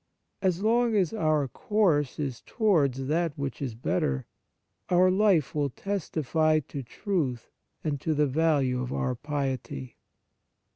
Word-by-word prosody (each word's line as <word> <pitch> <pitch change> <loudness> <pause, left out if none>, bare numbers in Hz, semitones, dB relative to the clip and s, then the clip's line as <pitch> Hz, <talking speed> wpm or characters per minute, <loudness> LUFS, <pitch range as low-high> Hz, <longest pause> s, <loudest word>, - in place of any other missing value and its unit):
As 185 0 +1
long 230 +1 +3
as 190 -3 +2
our 155 -8 +1
course 155 - +1
is 135 -5 -3
toward 170 - +2
that 150 +4 -1
which 140 0 -4
is 130 -5 -3
better, 65 - -1 0.6
our 185 +1 +5
life 190 -6 +3
will 145 -2 0
testify 155 -3 0
to 140 -1 -7
truth 135 - -3 0.3
and 145 -3 -2
to 160 - 0
the 150 0 +3
value 140 -3 +1
of 125 0 -4
our 130 -1 -1
piety. 130 - -4
150 Hz, 135 wpm, -28 LUFS, 135-180 Hz, 0.6 s, our